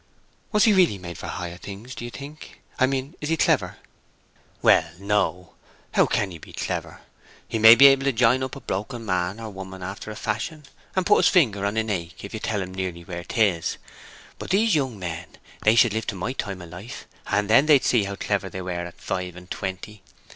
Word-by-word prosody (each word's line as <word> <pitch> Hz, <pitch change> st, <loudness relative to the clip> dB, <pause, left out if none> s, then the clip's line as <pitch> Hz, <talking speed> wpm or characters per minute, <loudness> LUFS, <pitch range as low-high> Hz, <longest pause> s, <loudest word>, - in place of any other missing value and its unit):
"Was 210 Hz, -1 st, +4 dB
he 220 Hz, -, +6 dB
really 180 Hz, -, +4 dB
made 85 Hz, -2 st, -8 dB
for -, -, -6 dB
higher 90 Hz, -1 st, -5 dB
things, 100 Hz, +7 st, -9 dB
do -, -, -8 dB
you 120 Hz, -, -5 dB
think? 145 Hz, +5 st, -10 dB, 0.2 s
I 130 Hz, -, +5 dB
mean, 135 Hz, +3 st, -3 dB
is 150 Hz, -, -3 dB
he 165 Hz, -, +1 dB
clever?" -, -, +1 dB, 0.9 s
"Well, 85 Hz, -, +5 dB
no. 100 Hz, -3 st, -1 dB, 0.4 s
How -, -, +4 dB
can 105 Hz, -4 st, 0 dB
he 85 Hz, -, -9 dB
be -, -, -13 dB
clever? -, -, -4 dB, 0.5 s
He 115 Hz, -, -2 dB
may 110 Hz, +1 st, +10 dB
be 135 Hz, +4 st, +8 dB
able 135 Hz, 0 st, +6 dB
to 140 Hz, -, +3 dB
jine 125 Hz, +1 st, +3 dB
up 130 Hz, -1 st, -4 dB
a -, -, -9 dB
broken 115 Hz, +4 st, -4 dB
man 90 Hz, +1 st, -1 dB
or 110 Hz, -1 st, -6 dB
woman 95 Hz, -1 st, -8 dB
after 100 Hz, +3 st, -6 dB
a 105 Hz, -, -6 dB
fashion, 135 Hz, +10 st, -3 dB, 0.3 s
and 185 Hz, -1 st, +1 dB
put 205 Hz, -, +5 dB
his -, -, +4 dB
finger 130 Hz, -, +3 dB
upon 100 Hz, +2 st, -1 dB
an 110 Hz, -1 st, 0 dB
ache 85 Hz, -3 st, -5 dB
if 100 Hz, -, -10 dB
you 110 Hz, -, -4 dB
tell 105 Hz, -2 st, -2 dB
him 95 Hz, 0 st, -9 dB
nearly 90 Hz, -2 st, -4 dB
where 85 Hz, 0 st, -6 dB
'tis; 95 Hz, -4 st, 0 dB, 0.6 s
but -, -, -7 dB
these 215 Hz, +4 st, +3 dB
young 130 Hz, -7 st, 0 dB
men—they 90 Hz, +4 st, -2 dB
should 120 Hz, -2 st, +5 dB
live 110 Hz, 0 st, -3 dB
to 100 Hz, -, -2 dB
my 105 Hz, +7 st, -3 dB
time 100 Hz, -8 st, -5 dB
of 85 Hz, -, -12 dB
life, 95 Hz, +8 st, -9 dB, 0.2 s
and 105 Hz, 0 st, +1 dB
then 120 Hz, +8 st, +5 dB
they'd 145 Hz, -4 st, +6 dB
see 115 Hz, -5 st, +3 dB
how 100 Hz, 0 st, -4 dB
clever 100 Hz, -1 st, -2 dB
they 95 Hz, -1 st, -6 dB
were 90 Hz, -, -4 dB
at 85 Hz, 0 st, -5 dB
five 90 Hz, -1 st, -4 dB
and 90 Hz, 0 st, -13 dB
twenty! 95 Hz, +2 st, -5 dB
105 Hz, 220 wpm, -24 LUFS, 95-125 Hz, 0.9 s, may